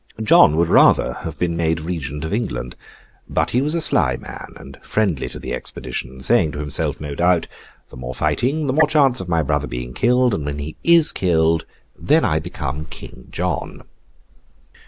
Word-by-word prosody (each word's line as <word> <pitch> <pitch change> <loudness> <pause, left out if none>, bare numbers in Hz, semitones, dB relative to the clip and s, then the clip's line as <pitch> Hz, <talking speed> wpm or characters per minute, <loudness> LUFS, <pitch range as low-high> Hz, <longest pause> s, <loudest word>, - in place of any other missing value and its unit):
John 75 -7 +6
would 85 0 +3
rather - - +5
have - - -7
been 85 -1 -1
made 80 -1 0
Regent 80 -3 -5
of 80 - -4
England; 105 - -3 0.5
but - - 0
he 125 - +2
was 150 +4 -1
a 170 - 0
sly - - +1
man, - - -9
and 70 0 -13
friendly 95 -10 -1
to - - -9
the - - -6
expedition; 65 +1 -5
saying 90 - +3
to - - -6
himself, 75 -1 -2
no 75 -1 -6
doubt, 85 +2 +2 0.4
'The - - -11
more 65 +1 -6
fighting, 145 - 0
the 130 - 0
more 155 +2 +4
chance 140 -5 +3
of 90 - -7
my 85 -2 +1
brother 75 -1 -1
being 60 0 -6
killed; 125 - +2
and 80 - -2
when 75 0 -4
he 75 +2 -6
is 170 -2 +6
killed, 80 -3 +1 0.3
then 155 +3 +2
I 75 0 +1
become 75 -3 -5
King 65 -3 -11
John! - - -4
80 Hz, 185 wpm, -20 LUFS, 75-120 Hz, 0.5 s, John